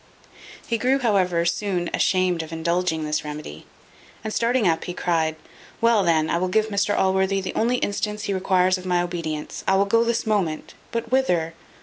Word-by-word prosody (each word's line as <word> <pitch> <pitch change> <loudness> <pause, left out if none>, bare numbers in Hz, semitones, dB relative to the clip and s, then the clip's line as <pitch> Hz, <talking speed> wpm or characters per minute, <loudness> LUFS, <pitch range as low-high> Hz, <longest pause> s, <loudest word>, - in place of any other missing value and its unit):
He 230 - -1
grew, 260 +3 +2
however, 185 -9 +1
soon 180 -1 -1
ashamed 185 -2 +1
of 160 0 -9
indulging 165 0 -1
this 150 0 -1
remedy; 150 - -8 0.6
and 215 -1 -4
starting 235 -2 +2
up, 165 -1 +1
he 180 - -5
cried, 160 -3 0 0.4
"Well, 230 -2 +4
then, 160 -3 +2
I 170 - 0
will 185 - 0
give 215 +4 +1
Mr 205 0 0
Allworthy 190 +1 +2
the 190 - -4
only 235 +3 +1
instance 210 -2 -2
he 200 - -1
requires 185 -1 +2
of 185 - -11
my 180 -1 +2
obedience. 165 -4 -5
I 190 - +4
will 195 +1 +3
go 230 +3 +3
this 235 0 -1
moment 190 -8 -1 0.2
but 230 0 -4
whither? 180 -11 +1
185 Hz, 185 wpm, -23 LUFS, 170-215 Hz, 0.6 s, Well